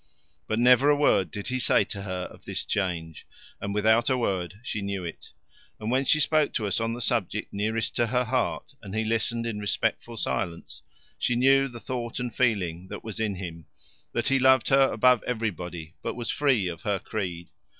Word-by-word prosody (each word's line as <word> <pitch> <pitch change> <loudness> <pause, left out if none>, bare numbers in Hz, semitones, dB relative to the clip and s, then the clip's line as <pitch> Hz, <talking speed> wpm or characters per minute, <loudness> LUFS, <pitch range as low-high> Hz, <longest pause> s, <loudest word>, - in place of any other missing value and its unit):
But 110 - -1
never 125 +3 +6
a 145 - +6
word 100 - +3
did 100 +5 -6
he 130 0 -1
say - - +4
to 100 - -6
her 95 -2 -4
of - - -16
this - - -2
change, 85 -5 -3 0.3
and 100 - -3
without 110 +4 +3
a 130 - +2
word 95 -4 -2
she 110 -4 -3
knew 100 -2 -3
it, 85 - -8 0.5
and 110 +2 -3
when 130 +2 +2
she 155 - +4
spoke 155 0 +2
to 110 - -1
us 100 0 0
on 115 0 -1
the 120 - -5
subject 105 -3 -1
nearest 110 +3 -1
to 120 - +2
her 125 +2 +1
heart 125 +3 -1
and 100 -1 -7
he 110 0 0
listened 115 +1 0
in 110 -3 -3
respectful 115 +3 -1
silence, 85 -5 -3 0.4
she 120 - +1
knew 135 +2 +4
the 120 -3 -9
thought 120 +2 -4
and 125 -1 -3
feeling 95 -8 0
that - - -8
was 110 -2 -6
in 105 -3 0
him 85 -4 -7 0.4
that - - 0
he 135 0 +3
loved 130 -1 +5
her 135 0 +5
above 125 -3 +4
everybody 90 -8 -3
but - - -3
was 120 -1 -3
free 135 -10 +2
of 85 -2 -5
her 105 -3 0
creed. 90 -4 -5
110 Hz, 200 wpm, -27 LUFS, 95-125 Hz, 0.5 s, never